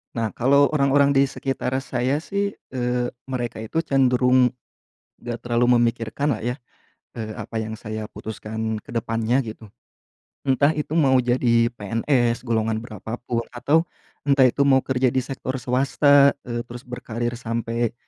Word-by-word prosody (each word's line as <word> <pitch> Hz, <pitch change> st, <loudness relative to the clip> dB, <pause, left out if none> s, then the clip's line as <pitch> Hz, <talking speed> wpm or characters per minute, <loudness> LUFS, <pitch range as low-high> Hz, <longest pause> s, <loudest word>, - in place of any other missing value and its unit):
Nah, 115 Hz, -2 st, -1 dB
kalau 140 Hz, +3 st, +3 dB
orang-orang 140 Hz, -1 st, +3 dB
di 135 Hz, 0 st, +4 dB
sekitar 135 Hz, -1 st, -3 dB
saya 135 Hz, +4 st, -1 dB
sih, 200 Hz, +1 st, -2 dB, 0.2 s
eee, 125 Hz, -1 st, -1 dB, 0.2 s
mereka 120 Hz, -4 st, -3 dB
itu 110 Hz, +9 st, -2 dB
cenderung 125 Hz, -2 st, +4 dB, 0.7 s
enggak 120 Hz, -1 st, -6 dB
terlalu 120 Hz, +1 st, +2 dB
memikirkan 120 Hz, +4 st, 0 dB
lah -, -, -9 dB
ya, 120 Hz, +1 st, -1 dB, 0.6 s
eee, 110 Hz, -1 st, -5 dB
apa 115 Hz, -, -5 dB
yang 110 Hz, 0 st, -3 dB
saya 110 Hz, 0 st, -6 dB
putuskan 110 Hz, +1 st, -5 dB
ke 105 Hz, -, -12 dB
depan 115 Hz, 0 st, -1 dB
nya 125 Hz, +4 st, +3 dB
gitu. 110 Hz, -1 st, -9 dB, 0.8 s
Entah 140 Hz, +3 st, +3 dB
itu 150 Hz, +1 st, -3 dB
mau 140 Hz, -5 st, +4 dB
jadi 120 Hz, -1 st, +2 dB
PNS, 115 Hz, +2 st, 0 dB
golongan 110 Hz, -2 st, 0 dB
berapa 110 Hz, 0 st, -7 dB
pun, 115 Hz, -1 st, 0 dB
atau 145 Hz, +7 st, +2 dB, 0.4 s
entah 135 Hz, -2 st, +5 dB
itu 140 Hz, +3 st, +1 dB
mau 135 Hz, -1 st, +5 dB
kerja 130 Hz, -1 st, +1 dB
di 130 Hz, -, +3 dB
sektor 130 Hz, 0 st, -5 dB
swasta, 140 Hz, +2 st, +4 dB
eee, 120 Hz, 0 st, -4 dB
terus 120 Hz, +1 st, -9 dB
berkarir 120 Hz, -2 st, -4 dB
sampai 115 Hz, 0 st, -2 dB
125 Hz, 150 wpm, -23 LUFS, 115-135 Hz, 0.8 s, entah